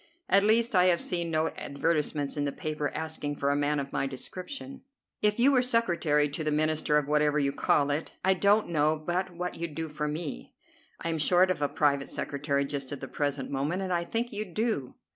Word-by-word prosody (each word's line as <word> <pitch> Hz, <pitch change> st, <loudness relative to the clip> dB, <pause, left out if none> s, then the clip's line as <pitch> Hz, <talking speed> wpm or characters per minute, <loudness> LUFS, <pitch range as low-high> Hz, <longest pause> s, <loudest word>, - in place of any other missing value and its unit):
At 195 Hz, +1 st, +5 dB
least 225 Hz, +2 st, +3 dB
I 180 Hz, -2 st, +5 dB
have 175 Hz, -2 st, +4 dB
seen 170 Hz, -2 st, -1 dB
no 160 Hz, 0 st, +1 dB
advertisements 145 Hz, -1 st, -1 dB
in 145 Hz, -, -1 dB
the 140 Hz, -, -1 dB
papers, 150 Hz, 0 st, -3 dB
asking 155 Hz, -2 st, -3 dB
for 140 Hz, 0 st, 0 dB
a -, -, +1 dB
man 145 Hz, 0 st, +1 dB
of 140 Hz, 0 st, -5 dB
my 135 Hz, -, 0 dB
description." 255 Hz, -, -7 dB, 0.4 s
"If 210 Hz, +1 st, +2 dB
you 265 Hz, +4 st, +6 dB
were 255 Hz, -2 st, +4 dB
secretary 170 Hz, -12 st, +2 dB
to 155 Hz, +3 st, -4 dB
the 155 Hz, -, 0 dB
Minister 155 Hz, 0 st, +2 dB
of 150 Hz, -2 st, 0 dB
whatever 150 Hz, 0 st, +2 dB
you 140 Hz, -2 st, +2 dB
call 145 Hz, +1 st, +2 dB
it, 150 Hz, +3 st, -3 dB
I 190 Hz, -, +5 dB
don't 200 Hz, +2 st, +3 dB
know 155 Hz, -1 st, +2 dB
but 175 Hz, +4 st, -2 dB
what 180 Hz, +1 st, -3 dB
you'd 165 Hz, -3 st, -5 dB
do 160 Hz, -1 st, -3 dB
for 150 Hz, 0 st, -3 dB
me. 150 Hz, 0 st, -5 dB, 0.5 s
I 165 Hz, -, -1 dB
am 160 Hz, -1 st, -1 dB
short 180 Hz, +4 st, +4 dB
of 175 Hz, -, -3 dB
a 145 Hz, -, +1 dB
private 140 Hz, -2 st, +1 dB
secretary 140 Hz, 0 st, -1 dB
just 140 Hz, -1 st, -4 dB
at 145 Hz, -, -5 dB
the 135 Hz, -, -6 dB
present 145 Hz, -1 st, -2 dB
moment, 150 Hz, +8 st, -1 dB
and 185 Hz, -1 st, -2 dB
I 170 Hz, 0 st, +1 dB
think 230 Hz, +6 st, -2 dB
you'd 205 Hz, -4 st, -5 dB
do." 215 Hz, -, -1 dB
155 Hz, 220 wpm, -28 LUFS, 145-185 Hz, 0.5 s, you